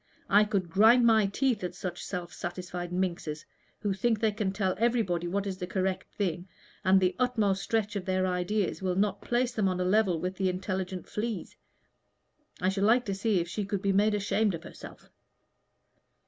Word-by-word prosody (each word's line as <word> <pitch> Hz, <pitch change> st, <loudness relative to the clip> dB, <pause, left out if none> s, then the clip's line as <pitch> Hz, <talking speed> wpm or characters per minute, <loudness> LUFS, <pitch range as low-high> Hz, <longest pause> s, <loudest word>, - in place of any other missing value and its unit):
I 205 Hz, +2 st, +6 dB
could 195 Hz, -5 st, -2 dB
grind 225 Hz, +6 st, +6 dB
my 220 Hz, -3 st, +5 dB
teeth 230 Hz, +1 st, 0 dB
at 180 Hz, 0 st, -4 dB
such 180 Hz, -1 st, -5 dB
self 175 Hz, -3 st, -5 dB
satisfied 175 Hz, 0 st, -5 dB
minxes, 175 Hz, -4 st, -2 dB, 0.4 s
who 205 Hz, -2 st, 0 dB
think 220 Hz, +3 st, +1 dB
they 220 Hz, -1 st, +2 dB
can 205 Hz, -2 st, -2 dB
tell 190 Hz, -1 st, 0 dB
everybody 220 Hz, -8 st, +1 dB
what 200 Hz, +3 st, -1 dB
is 190 Hz, -2 st, -4 dB
the 180 Hz, -, -4 dB
correct 185 Hz, 0 st, -2 dB
thing, 180 Hz, -2 st, -2 dB, 0.4 s
and 190 Hz, 0 st, +5 dB
the 185 Hz, -1 st, +1 dB
utmost 220 Hz, -6 st, +1 dB
stretch 215 Hz, -1 st, -1 dB
of 200 Hz, -, -2 dB
their 185 Hz, 0 st, +1 dB
ideas 185 Hz, +3 st, -1 dB
will 185 Hz, -1 st, 0 dB
not 200 Hz, 0 st, 0 dB
place 245 Hz, +1 st, 0 dB
them 215 Hz, -4 st, 0 dB
on 185 Hz, -1 st, -1 dB
a 180 Hz, -, 0 dB
level 190 Hz, -3 st, +2 dB
with 180 Hz, +2 st, -3 dB
the 190 Hz, -1 st, +1 dB
intelligent 185 Hz, 0 st, -3 dB
fleas. 220 Hz, -2 st, -4 dB, 1.0 s
I 185 Hz, -, +1 dB
should 195 Hz, 0 st, -2 dB
like 240 Hz, +4 st, +4 dB
to 200 Hz, -, -2 dB
see 195 Hz, -1 st, +1 dB
if 170 Hz, -, -4 dB
she 205 Hz, +4 st, -3 dB
could 200 Hz, 0 st, -3 dB
be 200 Hz, -1 st, +2 dB
made 210 Hz, +2 st, +3 dB
ashamed 205 Hz, -1 st, +1 dB
of 165 Hz, -, -9 dB
herself." -, -, -12 dB
195 Hz, 190 wpm, -29 LUFS, 180-215 Hz, 1.0 s, I